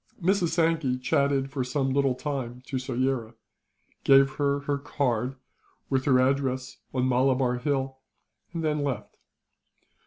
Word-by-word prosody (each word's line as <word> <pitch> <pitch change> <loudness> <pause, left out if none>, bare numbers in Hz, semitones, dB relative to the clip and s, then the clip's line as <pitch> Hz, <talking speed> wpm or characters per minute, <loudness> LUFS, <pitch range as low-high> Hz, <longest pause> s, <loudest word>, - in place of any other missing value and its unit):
Mrs. 185 0 +2
Sankey 160 -5 +1
chatted 135 +1 +1
for 135 -2 -1
some 135 +1 -1
little 135 -1 +2
time 125 -3 -4
to 130 - -3
Soyera; 130 -2 -1 0.7
gave 135 0 +6
her 140 -1 +1
her 140 0 -1
card, 130 -3 -1 0.6
with 130 -1 +1
her 130 -3 +5
address 130 0 0
on 130 -1 0
Malabar 130 -1 +2
Hill; 135 -1 -1 0.5
and 165 -1 -4
then 150 -1 +1
left. 135 -7 -3
135 Hz, 130 wpm, -27 LUFS, 130-140 Hz, 0.7 s, gave